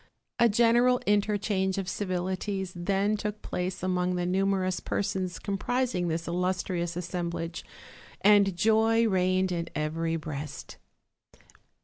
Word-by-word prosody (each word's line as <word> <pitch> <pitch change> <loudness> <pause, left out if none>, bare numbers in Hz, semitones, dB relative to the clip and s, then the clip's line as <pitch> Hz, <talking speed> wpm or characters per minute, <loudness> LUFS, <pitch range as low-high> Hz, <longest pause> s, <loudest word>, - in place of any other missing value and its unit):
A 235 - +6
general 240 +3 +4
interchange 205 -2 +1
of 195 -2 -2
civilities 190 0 -2
then 195 +4 +1
took 210 0 -4
place 180 +1 -3
among 180 -1 0
uhe 175 0 -1
numerous 185 -1 +1
persons 185 -3 -2
comprising 205 -1 -1
this 165 0 -2
illustrious 175 -1 -1
assem 175 0 -3
blage, 165 0 -5 0.6
and 200 -2 +5
joy 225 +3 +3
reigned 185 -1 +2
in 170 -1 -2
every 165 +2 -1
breast. 150 -2 -6
185 Hz, 115 wpm, -28 LUFS, 175-205 Hz, 0.6 s, A